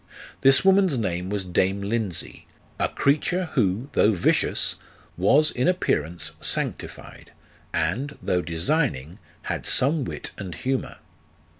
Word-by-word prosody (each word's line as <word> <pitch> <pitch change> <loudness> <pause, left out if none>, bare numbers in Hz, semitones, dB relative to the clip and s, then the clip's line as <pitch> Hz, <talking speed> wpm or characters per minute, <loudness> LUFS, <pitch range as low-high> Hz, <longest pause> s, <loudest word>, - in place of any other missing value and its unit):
This 135 +6 +5
woman's 190 -6 +4
name 90 -4 -2
was 100 -2 -2
dame 95 +2 0
Lindsey, 100 -3 -3 0.3
a - - +1
creature 160 +5 0
who, 110 -1 0
though 110 - +3
vicious, 90 - +1 0.4
was 140 - +4
in 125 - 0
appearance 85 - 0
sanctified, - - -3 0.4
and, 115 - -2
though 90 -1 0
designing, 85 - -1 0.2
had - - -4
some 145 +3 +2
wit - - -6
and 95 -5 -6
humour. 130 - -3
110 Hz, 120 wpm, -24 LUFS, 90-145 Hz, 0.4 s, This